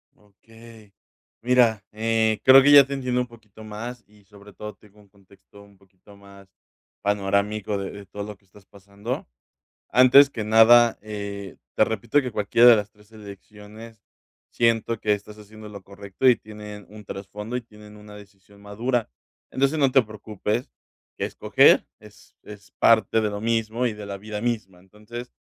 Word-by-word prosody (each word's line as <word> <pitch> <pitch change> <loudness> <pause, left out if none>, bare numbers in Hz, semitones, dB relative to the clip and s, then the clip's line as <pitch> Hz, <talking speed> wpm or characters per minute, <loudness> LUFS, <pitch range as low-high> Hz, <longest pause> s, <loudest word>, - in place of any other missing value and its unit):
Okey. 110 +1 -19 0.5
Mira, 120 -4 +2
eh, 110 0 0
creo 135 +1 +8
que 145 - +5
ya 140 -1 +9
te 140 - -6
entiendo 125 -2 -2
un 125 - -2
poquito 110 -2 -17
más 115 +3 -8
y 105 -1 -24
sobre 100 +1 -17
todo 105 +2 -9
tengo 105 0 -23
un 100 - -22
contexto 100 +1 -21
un 100 -1 -22
poquito 95 +1 -21
más 100 -1 -17 0.5
panorámico 100 +1 -1
de 100 -1 -5
de 100 -1 -11
todo 100 +2 -8
lo 105 -2 -9
que 100 - -35
estás 100 +1 -21
pasando. 100 +5 -8 0.6
Antes 130 +3 +6
que 110 - -5
nada, 115 +2 +5
eh, 100 -2 -7 0.2
te - - +4
repito 110 +6 0
que 125 -3 -6
cualquiera 110 +4 +4
de 120 - +8
las 105 -1 -4
3 105 +1 -25
elecciones 105 +2 -13 0.5
siento 115 -1 0
que 105 - 0
estás 105 +1 -11
haciendo 105 0 -13
lo 100 -2 -11
correcto 100 +5 -2
y 125 - +5
tienen 105 -1 -11
un 105 0 -13
trasfondo 105 +5 -7
y - - -3
tienen 105 -2 -16
una 105 0 -14
decisión 100 0 -18
madura. 115 +4 -3 0.4
Entonces, 140 +4 0
no 135 -3 +2
te 135 - +5
preocupes, 110 +1 -5 0.5
escoger - - +3
es - - -19
es 100 -2 -14
parte 110 -1 +3
de 105 -1 -1
lo 100 - -6
mismo 115 +2 -1
y 115 - -1
de 105 -1 -9
la 100 -1 -7
vida 105 +1 -7
misma, 110 -6 -4
entonces, 105 +6 -11
105 Hz, 170 wpm, -23 LUFS, 100-115 Hz, 0.6 s, ya